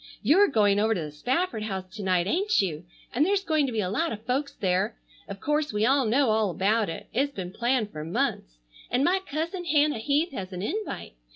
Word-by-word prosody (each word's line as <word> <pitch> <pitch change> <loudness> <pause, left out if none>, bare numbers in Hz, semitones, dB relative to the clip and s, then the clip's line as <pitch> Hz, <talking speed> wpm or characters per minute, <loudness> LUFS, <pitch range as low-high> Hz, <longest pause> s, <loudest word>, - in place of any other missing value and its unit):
You're 390 +7 +5
going 205 -5 +3
over 220 +1 +2
to - - -2
the 150 -1 -5
Spafford 250 - -1
house 190 -3 -3
to 215 - -6
night, 185 -3 +1
ain't 395 - +1
you? 170 -4 -1 0.3
and 265 - +3
there's 395 +3 +1
going 310 -5 +1
to - - -3
be 220 -2 0
a 180 - -2
lot 330 +9 0
of 215 +1 -7
folks 270 +3 -1
there. 190 +4 0 0.3
Of 200 -1 -7
course 300 +3 0
we 210 +1 +1
all 270 +1 +3
know 250 +1 +3
all 215 -2 +2
about 205 +5 +1
it. - - -6
It's 275 +4 +1
been 180 -2 -5
planned 235 0 0
for 150 0 -6
months. - - -2 0.3
And 250 +2 +1
my 365 +5 +3
cousin 335 +3 -3
Hannah 300 -5 +2
Heath 290 +8 +1
has 195 -7 -6
an 180 +1 -4
invite. 420 - -4
230 Hz, 220 wpm, -27 LUFS, 195-295 Hz, 0.3 s, You're